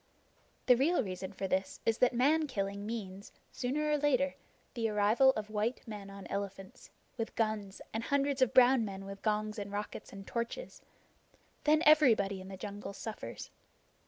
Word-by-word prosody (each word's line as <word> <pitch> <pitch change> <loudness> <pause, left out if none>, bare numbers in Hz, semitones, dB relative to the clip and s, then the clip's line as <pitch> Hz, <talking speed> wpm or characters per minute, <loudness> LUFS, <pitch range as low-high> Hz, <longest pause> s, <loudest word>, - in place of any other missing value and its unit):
The 250 - +7
real 280 +4 +2
reason 185 -1 -5
for 195 0 -4
this 190 0 -1
is 225 0 +1
that 250 - +5
man 295 +6 +3
killing 200 -4 -3
means, 200 -3 -6 0.2
sooner 285 +5 -1
or 295 - +2
later, 280 -1 +2 0.4
the 230 -3 -1
arrival 210 +5 +4
of 215 -2 -5
white 220 +4 -2
men 205 -3 -7
on 195 0 -10
elephants, 195 -1 -6 0.3
with 225 - -4
guns, 215 -3 -2
and 225 +1 -2
hundreds 280 -1 +1
of 260 - +4
brown 255 -2 +6
men 195 -2 -6
with 195 0 -8
gongs 215 0 -1
and 200 0 -5
rockets 205 +1 -5
and 195 0 -9
torches. 235 - -4 0.8
Then 305 +2 +4
everybody 225 -11 +5
in 190 - -10
the 190 0 -8
jungle 200 +1 -6
suffers. 220 +2 -7
215 Hz, 165 wpm, -32 LUFS, 200-260 Hz, 0.8 s, The